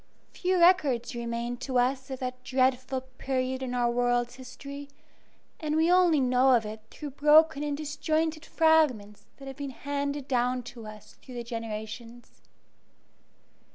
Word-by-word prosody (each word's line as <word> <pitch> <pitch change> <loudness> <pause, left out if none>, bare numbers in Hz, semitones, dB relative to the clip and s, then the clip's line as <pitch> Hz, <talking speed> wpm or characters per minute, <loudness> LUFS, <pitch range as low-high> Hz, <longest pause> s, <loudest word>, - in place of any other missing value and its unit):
Few 370 0 0
records 295 -10 +3
remain 235 0 -3
to 255 0 -2
us 260 +2 +1
of 265 - -4
that 255 0 -5
dreadful 260 0 +1 0.2
period 260 -1 -1
in 250 -1 -3
our 240 -1 +2
world's 245 0 +1
history, 280 +3 -9 0.7
and 305 -1 -2
we 325 +2 +3
only 355 -4 +5
know 255 0 +4
of 225 -2 +1
it 215 +1 -7
through 295 -2 -8
broken 300 +2 +5
and 295 -1 -2
disjointed 310 +1 -1
fragments 295 -11 +2
that 275 - -11
have 270 0 -8
been 285 -1 -4
handed 285 +1 -4
down 250 -1 0
to 230 -3 -10
us 215 -1 -12
through 255 - -11
the 240 - -4
generations. 230 +1 -7
260 Hz, 150 wpm, -28 LUFS, 245-290 Hz, 0.7 s, only